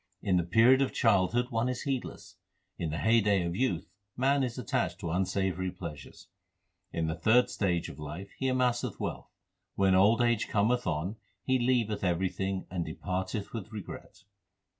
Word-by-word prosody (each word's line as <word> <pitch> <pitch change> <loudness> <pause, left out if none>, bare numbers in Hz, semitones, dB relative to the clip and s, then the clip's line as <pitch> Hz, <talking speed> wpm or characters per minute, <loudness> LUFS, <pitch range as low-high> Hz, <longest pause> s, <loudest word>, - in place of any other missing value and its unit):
In 95 -2 +2
the 90 - +2
period 115 +9 +5
of 135 - 0
childhood 115 +3 +2
one 115 +2 0
is 125 -1 -3
heedless; 135 -3 -4 0.4
In 85 - -2
the 75 - -3
heyday 105 -2 +3
of 85 0 -2
youth 105 -7 0 0.3
man 135 +2 +3
is 125 -2 -2
attached 90 -7 -1
to 85 -4 -3
unsavoury 95 +1 0
pleasures; 85 -5 -9 0.6
In 80 - -1
the 80 - -1
third 110 +10 +3
stage 90 -4 0
of 70 - -10
life 75 +6 -7
he 135 - 0
amasseth 125 -2 0
wealth; - - -4 0.5
When 95 -1 +3
old 100 +5 +5
age 120 -2 +1
cometh 115 +3 +1
on 90 +6 -2 0.3
he 130 -1 +2
leaveth 120 -5 +1
everything 95 +2 -1
and 90 -2 -1
de 80 -1 -6
parteth 95 +2 -3
with 110 -2 -6
regret. 105 -3 -9
100 Hz, 165 wpm, -30 LUFS, 90-120 Hz, 0.6 s, period